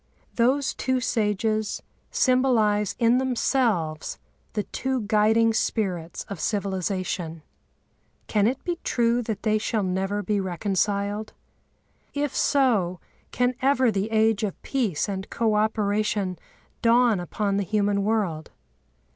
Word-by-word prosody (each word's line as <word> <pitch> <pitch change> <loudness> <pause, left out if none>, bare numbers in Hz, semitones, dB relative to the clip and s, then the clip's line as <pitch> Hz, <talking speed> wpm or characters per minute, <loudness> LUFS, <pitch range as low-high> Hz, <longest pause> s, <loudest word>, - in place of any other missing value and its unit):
Those 265 +4 +2
two 260 -1 0
sages 215 -2 0 0.3
symbolise 225 -6 +2
in 235 +2 +4
themselves 230 - 0 0.4
the 210 - -1
two 265 +2 -2
guiding 220 +2 +3
spirits 185 -7 -2
of 200 -4 -8
civilisation. 185 -5 -2 0.8
Can 210 -1 +2
it 255 +3 -2
be 350 -2 -3
true 240 0 +2
that 220 -3 -4
they 215 -1 +2
shall 215 -1 -1
never 195 +2 -1
be 210 -1 0
reconciled? 200 +3 -1 0.8
If 285 -1 -1
so, 215 - +2 0.3
can 250 0 +1
ever 260 -2 +3
the 200 +1 -1
age 220 -1 +2
of 210 -3 -3
peace 225 - -1
and 190 -1 -4
co 225 -2 +1
operation 210 -3 0 0.4
dawn 235 -3 +4
upon 200 +3 -1
the 200 - +1
human 205 0 +1
world? 195 -8 -1
215 Hz, 120 wpm, -25 LUFS, 195-235 Hz, 0.8 s, in